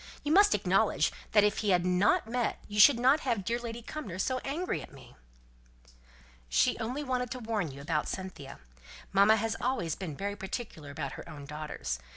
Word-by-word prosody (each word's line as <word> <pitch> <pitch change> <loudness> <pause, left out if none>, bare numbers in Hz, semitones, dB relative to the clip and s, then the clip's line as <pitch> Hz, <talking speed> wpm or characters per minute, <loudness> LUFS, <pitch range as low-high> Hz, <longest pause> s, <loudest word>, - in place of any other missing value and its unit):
You 295 - -1
must 405 +4 +6
acknowledge - - +2 0.2
that 210 - +5
if 210 - +2
he 210 - 0
had 180 -2 +3
not 180 +3 +3
met 240 0 -1
you 210 - -6
I - - +2
should 235 +3 +8
not 265 +5 +5
have 255 -5 0
had 195 - -6
dear 235 +3 0
Lady 235 -1 -6
Cumnor 230 - -6
so 255 +7 0
angry 285 - -2
with - - -10
me." - - -15 1.3
"She - - +3
only 250 +6 -3
wanted 250 -2 -1
to 255 - -5
warn 220 -7 -2
you 140 +1 -10
about 150 +1 -1
Cynthia. 165 -8 -6 0.6
Mamma 200 +3 +6
has 225 0 -1
always 240 - 0
been 160 -6 -6
very 200 +1 -3
particular 195 - -6
about 140 -1 -4
her - - -9
own 145 -2 -9
daughters. 150 - -5
210 Hz, 195 wpm, -30 LUFS, 165-250 Hz, 1.3 s, should